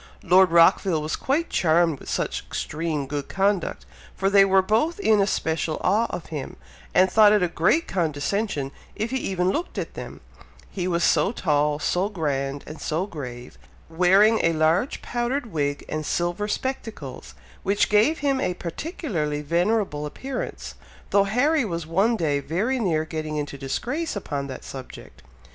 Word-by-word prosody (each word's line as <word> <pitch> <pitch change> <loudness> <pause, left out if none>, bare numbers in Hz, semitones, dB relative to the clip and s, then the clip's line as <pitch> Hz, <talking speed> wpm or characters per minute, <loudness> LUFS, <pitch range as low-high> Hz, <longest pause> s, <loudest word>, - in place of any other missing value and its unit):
Lord 185 +2 +5
Rockville 170 +1 +4
was 155 - -2
quite 300 +6 -1
charmed 165 -2 +2
with - - -10
such - - -1
extreme 155 -2 -3
good 145 +1 -4
conduct, 195 -1 0 0.3
for 195 0 0
they 200 -1 +7
were 190 -1 +4
both 230 - +1
in 220 - +4
especial 160 -5 -1
awe 215 +5 +3
of 180 - -5
him, 145 -3 -5 0.4
and 185 - +5
thought 210 +2 +6
it 210 -3 +3
a - - +3
great 175 - +1
condescension 160 -2 -1 0.2
if 220 +3 -3
he 265 - 0
even 185 -6 0
looked 330 - -4
at - - -4
them, - - -8 0.5
he 180 -2 -3
was 170 -1 0
so - - +3
tall, 150 -8 +1
so 180 +6 0
grand, 140 -7 -2
and 155 - -9
so 165 +4 -1
grave, 125 -9 -8 0.3
wearing 190 +6 +4
a 165 - +3
large 160 - +1
powdered 240 0 -2
wig 145 -2 -2
and 155 0 -3
silver 175 +6 -1
spectacles, 215 - -5 0.3
which 200 +1 +2
gave 215 +10 +3
him 270 -2 +2
a 180 - -1
particularly 170 - -3
venerable 170 -1 0
appearance, 260 - -6 0.4
though 200 -1 +4
Harry 270 +9 +2
was 170 -6 -3
one 195 +9 +2
day 150 -6 0
very 200 - -1
near 160 -8 0
getting 155 -1 -4
into 145 -1 -4
disgrace 245 - -3
upon 145 -8 -4
that 130 -2 -8
subject. 130 -2 -10
180 Hz, 160 wpm, -24 LUFS, 155-215 Hz, 0.5 s, they